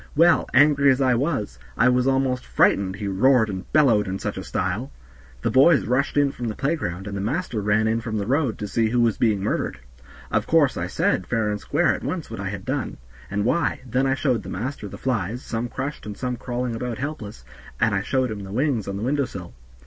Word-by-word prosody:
Well, 170 Hz, +3 st, +4 dB
angry 140 Hz, 0 st, +5 dB
as 130 Hz, 0 st, +3 dB
I 130 Hz, -2 st, +3 dB
was, 120 Hz, -, -1 dB, 0.2 s
I 120 Hz, -, +4 dB
was 125 Hz, +1 st, +3 dB
almost 135 Hz, -2 st, +1 dB
frightened, 95 Hz, -1 st, +2 dB
he 100 Hz, 0 st, -5 dB
roared 110 Hz, +3 st, +3 dB
and 95 Hz, 0 st, -7 dB
bellowed 120 Hz, -10 st, +4 dB
in 95 Hz, +1 st, -2 dB
such -, -, -4 dB
a -, -, -5 dB
style. 70 Hz, -, -2 dB, 0.5 s
The -, -, +1 dB
boys 140 Hz, +3 st, +5 dB
rushed 130 Hz, +4 st, 0 dB
in 145 Hz, -1 st, +3 dB
from 120 Hz, -3 st, -5 dB
the 110 Hz, -, -3 dB
playground, 115 Hz, -, -2 dB
and 100 Hz, -1 st, -5 dB
the 100 Hz, -, -3 dB
master 120 Hz, -, -2 dB
ran 105 Hz, +2 st, +2 dB
in 115 Hz, +1 st, 0 dB
from 110 Hz, -2 st, -3 dB
the 100 Hz, -, -2 dB
road 130 Hz, -1 st, 0 dB
to 105 Hz, -, -4 dB
see 110 Hz, +2 st, +1 dB
who 120 Hz, +2 st, +1 dB
was 115 Hz, -3 st, +2 dB
being 105 Hz, -4 st, +2 dB
murdered. -, -, -1 dB, 0.5 s
Of -, -, 0 dB
course -, -, +3 dB
I -, -, -2 dB
said -, -, 0 dB
fair 110 Hz, -2 st, 0 dB
and 105 Hz, -, -3 dB
square -, -, +2 dB
at -, -, -6 dB
once -, -, -4 dB
what -, -, -6 dB
I -, -, -3 dB
had -, -, -6 dB
done, -, -, -3 dB, 0.3 s
and 100 Hz, 0 st, -1 dB
why; 170 Hz, +8 st, +1 dB
then 130 Hz, +2 st, 0 dB
I 135 Hz, -, +2 dB
showed 130 Hz, -5 st, 0 dB
the -, -, -9 dB
master 115 Hz, +2 st, -4 dB
the -, -, -9 dB
flies, 120 Hz, -2 st, -2 dB
some 115 Hz, +1 st, -3 dB
crushed 140 Hz, -1 st, -5 dB
and 105 Hz, -1 st, -6 dB
some 125 Hz, -1 st, -2 dB
crawling 120 Hz, 0 st, -3 dB
about 120 Hz, -1 st, -4 dB
helpless, 115 Hz, -, -6 dB, 0.3 s
and 115 Hz, -2 st, +2 dB
I 95 Hz, -, +1 dB
showed 130 Hz, +2 st, 0 dB
him 105 Hz, -, -5 dB
the 95 Hz, -1 st, -8 dB
wings 125 Hz, -2 st, 0 dB
on 100 Hz, 0 st, -3 dB
the 100 Hz, -, -4 dB
window 140 Hz, +3 st, +1 dB
sill. 90 Hz, -7 st, -9 dB
120 Hz, 235 wpm, -23 LUFS, 105-135 Hz, 0.5 s, angry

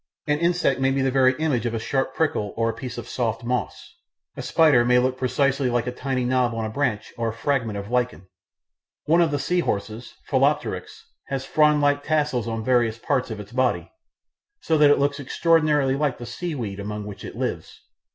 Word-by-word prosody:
An 150 Hz, -1 st, +1 dB
insect 170 Hz, -6 st, +1 dB
may 135 Hz, 0 st, +2 dB
be 135 Hz, 0 st, 0 dB
the 135 Hz, -, +1 dB
very 130 Hz, -1 st, +4 dB
image 135 Hz, -7 st, 0 dB
of 115 Hz, -, -3 dB
a -, -, -1 dB
sharp 135 Hz, +3 st, -2 dB
prickle 125 Hz, -10 st, -1 dB
or 115 Hz, 0 st, +1 dB
a -, -, -10 dB
piece 125 Hz, -2 st, -7 dB
of 120 Hz, 0 st, -6 dB
soft 115 Hz, -2 st, -2 dB
moss; 125 Hz, 0 st, -4 dB, 0.4 s
a -, -, -5 dB
spider 155 Hz, -7 st, +4 dB
may 125 Hz, +1 st, +4 dB
look 130 Hz, +1 st, +2 dB
precisely 130 Hz, +1 st, +1 dB
like 120 Hz, 0 st, 0 dB
a 125 Hz, -, -2 dB
tiny 130 Hz, 0 st, -2 dB
knob 125 Hz, -2 st, +1 dB
on 115 Hz, -1 st, -2 dB
a 110 Hz, -, -4 dB
branch 115 Hz, -4 st, -2 dB
or 115 Hz, -1 st, 0 dB
a -, -, -5 dB
fragment 115 Hz, -3 st, -1 dB
of 100 Hz, +2 st, -7 dB
lichen; 125 Hz, -6 st, -1 dB, 0.8 s
one 165 Hz, +3 st, +4 dB
of 165 Hz, -, +3 dB
the 145 Hz, -, -1 dB
sea 180 Hz, +5 st, 0 dB
horses 110 Hz, -4 st, -3 dB
(Phyllopteryx) -, -, 0 dB, 0.2 s
has 135 Hz, -1 st, -3 dB
frond 150 Hz, 0 st, +3 dB
like 145 Hz, 0 st, +2 dB
tassels 145 Hz, -7 st, 0 dB
on 115 Hz, -1 st, -3 dB
various 120 Hz, -3 st, +2 dB
parts 130 Hz, +2 st, -1 dB
of 110 Hz, -2 st, -5 dB
its 105 Hz, 0 st, -10 dB
body, 130 Hz, +1 st, 0 dB, 0.7 s
so 160 Hz, -, +1 dB
that 150 Hz, -1 st, +6 dB
it 145 Hz, -, +5 dB
looks 140 Hz, +1 st, 0 dB
extraordinarily 150 Hz, -1 st, +2 dB
like 140 Hz, -2 st, 0 dB
the 120 Hz, -, -8 dB
seaweeds 120 Hz, -, -5 dB
among 105 Hz, +1 st, -5 dB
which 105 Hz, -2 st, -9 dB
it -, -, -8 dB
lives. -, -, -4 dB
130 Hz, 205 wpm, -24 LUFS, 115-145 Hz, 0.8 s, that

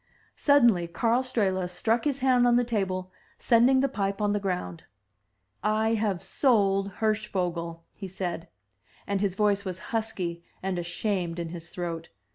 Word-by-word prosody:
Suddenly 235 Hz, -, +4 dB
Karl 230 Hz, +8 st, +1 dB
Strehla 190 Hz, -8 st, 0 dB
struck 225 Hz, +7 st, 0 dB
his 280 Hz, -2 st, -1 dB
hand 250 Hz, -2 st, +4 dB
on 240 Hz, -, +4 dB
the 245 Hz, -, +4 dB
table, 190 Hz, -5 st, -2 dB, 0.3 s
sending 250 Hz, +2 st, +4 dB
the 275 Hz, -, +3 dB
pipe 200 Hz, -6 st, -2 dB
on 205 Hz, -1 st, +1 dB
the 205 Hz, -, +1 dB
ground. 180 Hz, -, -4 dB, 0.8 s
*1 220 Hz, +2 st, +2 dB
have 205 Hz, -5 st, -1 dB
sold 200 Hz, -6 st, +2 dB
Hirschvogel," 180 Hz, -6 st, -1 dB
he 195 Hz, -, -7 dB
said; 175 Hz, -2 st, -4 dB, 0.6 s
and 200 Hz, -1 st, -1 dB
his 195 Hz, -3 st, 0 dB
voice 205 Hz, -1 st, +2 dB
was 185 Hz, -2 st, -4 dB, 0.2 s
husky 185 Hz, -7 st, -2 dB, 0.2 s
and 190 Hz, -2 st, -1 dB
ashamed 175 Hz, 0 st, -2 dB
in 170 Hz, -1 st, -4 dB
his 170 Hz, 0 st, -7 dB
throat. 165 Hz, -2 st, -5 dB
195 Hz, 150 wpm, -27 LUFS, 180-225 Hz, 0.8 s, Suddenly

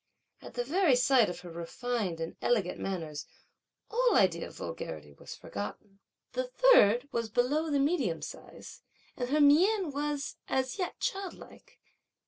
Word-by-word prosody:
At -, -, -11 dB
the 245 Hz, -, -1 dB
very 315 Hz, +1 st, +3 dB
sight 250 Hz, -3 st, +4 dB
of 175 Hz, 0 st, -6 dB
her 175 Hz, -1 st, -10 dB
refined 190 Hz, +1 st, -3 dB
and 165 Hz, 0 st, -5 dB
elegant 210 Hz, -7 st, +1 dB
manners 160 Hz, -6 st, -4 dB, 0.6 s
all 480 Hz, -1 st, +3 dB
idea 170 Hz, -3 st, +3 dB
of -, -, -14 dB
vulgarity 75 Hz, -2 st, -7 dB
was -, -, -10 dB
forgotten. 195 Hz, -, -7 dB, 0.3 s
The -, -, -2 dB
third 285 Hz, -, +5 dB
was 230 Hz, -1 st, -2 dB
below 275 Hz, +8 st, +1 dB
the 290 Hz, -, +1 dB
medium 275 Hz, -, 0 dB
size, -, -, -10 dB, 0.3 s
and 245 Hz, -1 st, -3 dB
her 300 Hz, +3 st, +2 dB
mien 345 Hz, +5 st, +4 dB
was, 290 Hz, 0 st, -3 dB
as 260 Hz, +5 st, -1 dB
yet, 360 Hz, -, -3 dB
childlike. 390 Hz, -1 st, -6 dB
250 Hz, 145 wpm, -30 LUFS, 185-305 Hz, 0.6 s, third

